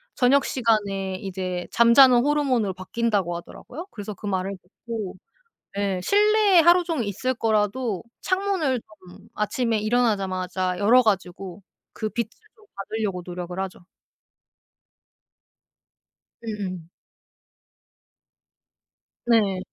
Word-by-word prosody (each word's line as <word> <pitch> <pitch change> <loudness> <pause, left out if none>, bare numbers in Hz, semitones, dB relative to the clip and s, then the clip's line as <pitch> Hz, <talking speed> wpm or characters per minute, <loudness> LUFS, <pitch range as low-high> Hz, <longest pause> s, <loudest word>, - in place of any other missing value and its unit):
저녁 270 +2 +3
시간에 200 -6 0
이제 185 -2 -4
잠자는 240 +1 +7
호르몬으로 265 -9 +1
바뀐다고 190 -2 -1
하더라고요. 315 - -10
그래서 210 -1 -7
그 205 - -11
말을 190 0 -2
듣고 210 +1 -7 0.6
예 195 -2 -1
실내에 415 - +4
하루 345 +2 +5
종일 320 -9 -2
있을 255 +6 -2
거라도 220 -1 0 0.2
창문을 370 - 0
조금 190 -3 -17
아침에 225 +1 0
일어나자마자 190 -5 0
열어 235 +5 +5
가지고 190 -2 -2 0.3
그 215 - -3
빛을 235 0 -3 0.3
좀 430 - -21
받으려고 195 -2 -3
노력을 180 0 -6
하죠. 185 -2 -6 2.6
음음. 185 -6 -5 2.4
네. 210 -5 +3
210 Hz, 245 characters per minute, -24 LUFS, 190-250 Hz, 2.6 s, 잠자는